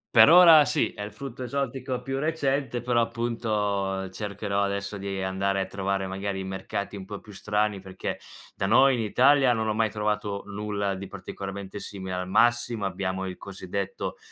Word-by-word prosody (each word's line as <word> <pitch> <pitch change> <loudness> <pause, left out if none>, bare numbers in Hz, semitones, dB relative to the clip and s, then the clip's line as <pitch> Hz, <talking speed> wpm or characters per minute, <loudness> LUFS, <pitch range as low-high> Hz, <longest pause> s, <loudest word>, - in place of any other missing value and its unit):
Per 110 - +9
ora 165 -4 +9
sì, - - +1
è 105 - -7
il 105 0 -7
frutto 130 +1 -7
esotico 130 -1 -3
più 135 0 -3
recente, 140 -5 0
però 120 -1 +1
appunto, 105 -5 -1
cercherò 100 0 -3
adesso 100 +1 -2
di 95 -1 -4
andare 95 +1 0
a - - -1
trovare 95 0 -2
magari 95 +1 -3
i - - -4
mercati 95 +2 -4
un 95 - -8
po' 100 +1 -7
più 105 - -14
strani, 105 0 -1
perché 95 0 -5 0.3
da 95 - -2
noi 130 +5 +5
in - - -3
Italia 130 +4 +4
non 110 -1 -1
ho 110 - +1
mai 110 0 +1
trovato 105 -1 -2
nulla 100 -1 -2
di 95 0 -7
particolarmente 100 +1 -7
simile, 95 -2 -6
al 90 0 -3
massimo, 120 +1 +2
abbiamo 95 0 -2
il 90 -1 -6
cosiddetto 95 0 -5
105 Hz, 175 wpm, -26 LUFS, 95-120 Hz, 0.3 s, Per